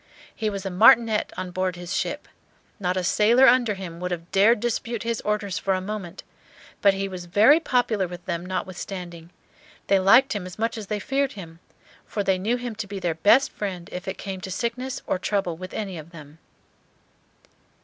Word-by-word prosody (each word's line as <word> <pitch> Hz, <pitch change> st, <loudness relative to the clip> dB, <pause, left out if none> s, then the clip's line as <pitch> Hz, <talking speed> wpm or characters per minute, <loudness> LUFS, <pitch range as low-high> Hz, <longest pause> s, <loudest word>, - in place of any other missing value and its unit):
He 220 Hz, -1 st, -1 dB
was 200 Hz, -1 st, -5 dB
a 195 Hz, -, -2 dB
Martinet 220 Hz, +3 st, +5 dB
on 185 Hz, -1 st, -4 dB
board 185 Hz, 0 st, -1 dB
his 175 Hz, 0 st, -5 dB
ship. -, -, -3 dB, 0.5 s
Not 185 Hz, -1 st, -1 dB
a 185 Hz, -, 0 dB
sailor 230 Hz, +8 st, +5 dB
under 240 Hz, -5 st, +4 dB
him 175 Hz, -3 st, -8 dB
would 180 Hz, 0 st, -3 dB
have 175 Hz, -1 st, -5 dB
dared 210 Hz, +4 st, +4 dB
dispute 235 Hz, 0 st, -2 dB
his 230 Hz, -1 st, -2 dB
orders 210 Hz, -2 st, -2 dB
for 195 Hz, -1 st, 0 dB
a -, -, -1 dB
moment; 195 Hz, -2 st, -6 dB, 0.6 s
but 200 Hz, -1 st, +5 dB
he 195 Hz, 0 st, -2 dB
was 185 Hz, -2 st, -7 dB
very 215 Hz, -, +5 dB
popular 240 Hz, -, 0 dB
with 175 Hz, 0 st, -10 dB
them, 170 Hz, -1 st, -3 dB
notwithstanding; 180 Hz, -2 st, -6 dB, 0.6 s
they 195 Hz, -, +3 dB
liked 230 Hz, +8 st, +5 dB
him 200 Hz, -4 st, -4 dB
as 180 Hz, -, -10 dB
much 225 Hz, +1 st, -1 dB
as 215 Hz, -3 st, -7 dB
they 210 Hz, -, -2 dB
feared 275 Hz, +4 st, -1 dB
him, 165 Hz, -5 st, -10 dB, 0.4 s
for 205 Hz, -, -3 dB
they 190 Hz, -1 st, +1 dB
knew 225 Hz, +6 st, 0 dB
him 245 Hz, -2 st, -5 dB
to 220 Hz, -2 st, -4 dB
be 200 Hz, 0 st, -6 dB
their 175 Hz, -3 st, -1 dB
best 225 Hz, -, +4 dB
friend 185 Hz, -4 st, -5 dB
if 180 Hz, +1 st, -6 dB
it 190 Hz, -, -4 dB
came 190 Hz, -2 st, -6 dB
to 190 Hz, -, -6 dB
sickness 245 Hz, +6 st, -3 dB
or 185 Hz, -, -1 dB
trouble 195 Hz, -3 st, -1 dB
with 185 Hz, +2 st, -8 dB
any 195 Hz, -5 st, -4 dB
of 155 Hz, +1 st, -11 dB
them. 155 Hz, -2 st, -13 dB
195 Hz, 200 wpm, -24 LUFS, 180-220 Hz, 0.6 s, Martinet